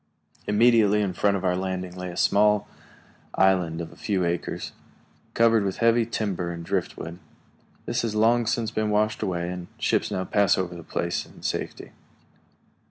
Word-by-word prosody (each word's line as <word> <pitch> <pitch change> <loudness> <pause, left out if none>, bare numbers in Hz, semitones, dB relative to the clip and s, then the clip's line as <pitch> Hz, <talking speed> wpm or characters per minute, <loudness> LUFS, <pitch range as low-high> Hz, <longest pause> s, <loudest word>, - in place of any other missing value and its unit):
Immediately 105 -1 +4
in 95 -2 -2
front 100 +2 +2
of 95 - -5
our 90 -1 +2
landing 95 -1 -3
lay 90 0 -5
a 85 - -8
small 105 +1 +3 0.7
island 90 -4 +2
of 80 - -7
a - - -15
few 95 -4 -1
acres, 85 0 -3 0.6
covered 115 -2 +4
with 95 -1 -2
heavy 115 0 +3
timber 100 -6 -2
and 85 -1 -6
driftwood. 90 -2 -3 0.7
This 120 - -1
has 115 -2 -2
long 115 +2 +3
since 115 -1 0
been 110 0 -1
washed 105 +1 +1
away, 90 -4 -2
and 90 -1 -6
ships - - +1
now 95 - -2
pass 100 0 +2
over 90 -2 -2
the 85 - -8
place 85 +2 -2
in - - -17
safety. - - -4
95 Hz, 165 wpm, -25 LUFS, 90-110 Hz, 0.7 s, Immediately